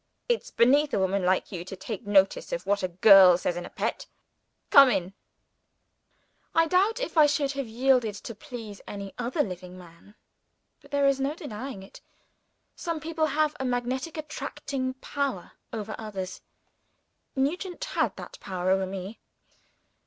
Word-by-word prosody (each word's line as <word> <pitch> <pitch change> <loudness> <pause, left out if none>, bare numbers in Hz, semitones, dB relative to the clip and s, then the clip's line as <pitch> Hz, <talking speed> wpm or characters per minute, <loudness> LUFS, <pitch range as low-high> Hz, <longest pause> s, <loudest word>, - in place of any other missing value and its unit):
It's 480 -2 0
beneath 280 +5 +3
a - - +1
woman 190 0 +1
like 185 +1 +1
you 175 -3 -5
to 185 - -8
take 200 +2 -7
notice 205 - +3
of - - -3
what 200 0 +1
a 185 - 0
girl 185 0 +7
says 175 -1 -2
in 175 0 -5
a - - -12
pet. - - -3 0.6
Come 275 -2 +9
in!" 190 -4 -1 1.4
I 330 0 +5
doubt 390 +8 +2
if - - -1
I 300 - +8
should 285 -1 0
have 275 -3 -4
yielded 240 -2 +2
to 230 - -8
please 225 -5 -9
any 200 -1 -7
other 250 +6 0
living 180 -1 -8
man. 175 +4 -16 0.7
But, - - -18
there 285 -1 +1
is 275 -1 +3
no 275 +3 -1
denying 260 - -7
it, 195 - -14 0.7
some 335 -3 -3
people 315 0 -1
have 305 0 +1
a - - -2
magnetic 255 +5 -2
attracting 275 -3 -4
power 265 -7 -3 0.2
over 215 -1 -5
others. 195 -4 -6 0.9
Nugent 350 - -2
had - - -1
that - - -10
power 185 -1 -2
over 190 0 +2
me. 195 +3 -7
240 Hz, 160 wpm, -27 LUFS, 195-290 Hz, 1.4 s, Come